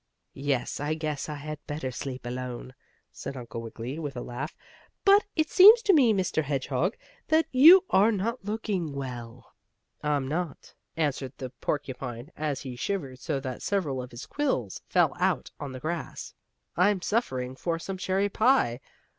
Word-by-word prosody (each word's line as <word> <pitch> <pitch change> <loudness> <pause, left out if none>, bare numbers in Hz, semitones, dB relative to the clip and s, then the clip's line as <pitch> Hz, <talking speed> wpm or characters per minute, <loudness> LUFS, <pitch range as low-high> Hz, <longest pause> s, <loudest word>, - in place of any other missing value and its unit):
"Yes, 135 -2 -1
I 150 +2 -1
guess 155 -2 -3
I 150 - -3
had 150 +1 -7
better 145 -3 -3
sleep 130 0 -6
alone," 125 0 -5 0.4
said 135 - -7
Uncle 115 -2 -6
Wiggily, 115 +5 -6
with 145 -5 -5
a 120 - -4
laugh. 135 +6 -5 0.5
"But 400 +1 +6
it 315 0 +1
seems 435 +5 +9
to 400 - +5
me, 265 -8 +6
Mr. 185 -6 +1
Hedgehog, 140 - -1 0.3
that 315 0 +4
you 325 +9 +9
are 210 +4 +5
not 225 +3 -2
looking 205 -7 -2
well." 125 -3 -7 0.5
"I'm 145 -3 0
not," 160 +2 -4 0.2
answered 140 -4 -1
the 130 -2 -6
porcupine, 130 -1 -4
as 150 -2 -2
he 130 -3 -6
shivered 135 -3 -3
so 135 - -2
that 130 -2 -5
several 155 -10 -1
of 125 - -8
his 120 -1 -9
quills 130 - -2
fell - - +3
out - - 0
on 140 - -5
the 130 - -7
grass. 160 +4 -5 0.4
"I'm 185 +1 +3
suffering 130 - -1
for 165 +4 -2
some 190 +3 -5
cherry 190 +1 +1
pie. 215 - +3
150 Hz, 165 wpm, -28 LUFS, 130-195 Hz, 0.5 s, seems